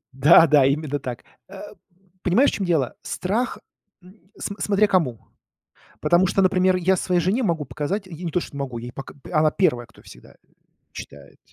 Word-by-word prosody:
Да, 140 +5 +6
да, 145 -2 +4
именно 145 +1 -1
так. 125 -3 -7 0.3
Э, 195 0 -10 0.6
понимаешь, 230 +11 +3
в - - -6
чем 195 - -3
дело, 155 -8 0
страх, 220 +7 -2 0.4
м 185 +1 -20
см 200 - -6
смотря 205 +1 +3
кому. 155 - 0 0.8
Потому 175 +2 +3
что, 195 +1 +1
например, 185 0 +3
я 185 +1 +2
своей 180 0 0
жене 195 +9 0
могу 170 -7 -1
показать, 155 - -4
я 175 0 -9
не 170 - -2
то 175 - 0
что 140 - -9
не - - -5
могу, 130 -4 -4
я 120 - -8
ей 120 - -9
пока 135 - -9 0.2
она 155 -1 +3
первая, 125 -10 0
кто 115 - -21
всегда, - - -16
э, - - -26 0.6
читает. 70 0 -12
175 Hz, 195 wpm, -22 LUFS, 140-190 Hz, 0.8 s, Да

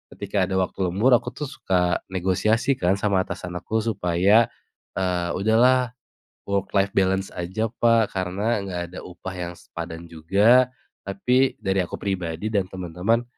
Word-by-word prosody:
ketika 100 -2 -1
ada 95 - -2
waktu 95 0 0
lembur 105 +9 +2
aku 125 +1 +2
tuh 150 -3 -5
suka 90 -6 0
negosiasi 95 +8 +1
kan 90 +2 +2
sama 100 -2 0
atasan 90 0 -5
aku 110 +4 -2
supaya, 100 +1 +3 0.5
eee, 90 -2 0
"Udah 110 +4 +2
lah 130 +1 +6 0.7
work 100 0 -1
life 100 0 +3
balance 95 0 +2
aja, 95 +6 -2
Pak, 115 -2 +2
karena 95 +5 -1
nggak 90 -2 -4
ada - - -5
upah 90 +1 -8
yang 85 0 -4
sepadan 85 0 -8
juga. 100 +10 +4 0.4
Tapi 125 +7 +2
dari 95 0 0
aku - - -6
pribadi 95 +1 -3
dan 100 -3 +1
temen-temen 95 +6 -1
95 Hz, 155 wpm, -24 LUFS, 90-110 Hz, 0.7 s, lah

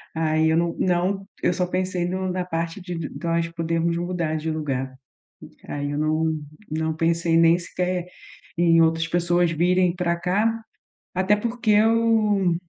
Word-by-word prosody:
Aí 160 0 +2
eu 160 - +3
não 170 0 0
não 185 +2 0 0.2
eu - - +3
só 180 +1 0
pensei 185 -1 -1
no 185 0 -2
na 180 0 -2
parte 165 +1 -3
de 180 -1 -6
de 160 -3 -4
nós 170 0 0
podermos 165 0 -1
mudar 175 -3 -2
de 160 +1 -3
lugar, 135 -4 -3 0.8
aí 145 0 -3
eu 145 - -3
não, 155 +1 0 0.3
não 160 +1 -1
pensei 165 +1 +1
nem 165 +1 +5
sequer 180 0 -2 0.5
em 165 -1 +4
outras 165 0 +2
pessoas 175 0 +2
virem 175 +2 +2
pra 175 -1 0
cá, 210 +6 0 0.5
até 190 +3 +2
porque 235 +1 -2
eu, 215 -4 +3
170 Hz, 155 wpm, -23 LUFS, 165-185 Hz, 0.8 s, nem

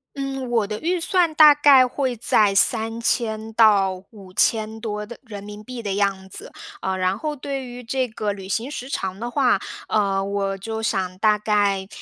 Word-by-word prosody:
嗯， 270 -2 -4
我 225 -4 +1
的 210 0 -4
预 350 +2 0
算 345 -2 +1
大 300 -2 +8
概 275 -3 +6
会 255 -2 -2
在 210 -2 +3
3000 225 0 0
到 195 -4 +3
5000 215 +2 -1
多 210 -2 -4
的 240 +2 -10
人 205 -4 -9
民 210 +1 -10
币 250 0 -7
的 200 -3 -3
样 195 -1 -1
子， - - -10 0.3
呃， 190 0 -2
然 185 +2 0
后 300 +4 -3
对 275 -1 -5
于 245 0 -9
这 255 +1 -2
个 210 -2 -3
旅 190 -1 -10
行 230 +6 -2
时 265 -2 -7
长 190 -7 -3
的 240 0 -4
话， 265 -3 +3 0.3
呃， 195 -2 +1
我 195 -1 -2
就 220 +2 -5
想 185 -3 -2
大 210 0 +3
概， 205 -2 0
220 Hz, 185 characters per minute, -22 LUFS, 200-250 Hz, 0.3 s, 大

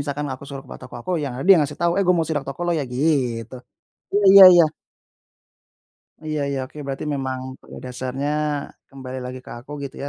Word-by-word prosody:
misalkan 145 +1 -3
aku 130 - -9
suruh 135 -1 -7
ke - - -20
poto - - -10
toko - - -12
aku, 150 - -6
yang 135 - -4
ada 140 - -4
yang 185 -4 +8
ngasih 145 0 -5
tahu, 170 0 +3
"eh - - +3
gua 180 - +4
mau 160 - 0
sidak 150 -3 -2
toko 135 +4 -7
lu 175 - +1
ya" - - -1
gitu. 125 -5 0 0.6
Mmm, 205 0 +1
iya 195 0 +11
iya. 175 -2 +7 1.6
Iya 155 -1 -3
iya, 140 -1 -2
oke 130 +3 -10
berarti 135 +2 -4
memang 130 -2 -3 0.2
pada - - -12
dasarnya, 130 +3 -4 0.6
kembali 130 -1 -8
lagi 130 0 -7
ke - - -13
aku 130 +5 -15
gitu 135 - -7
ya, 140 - -5
140 Hz, 215 wpm, -22 LUFS, 130-155 Hz, 1.6 s, iya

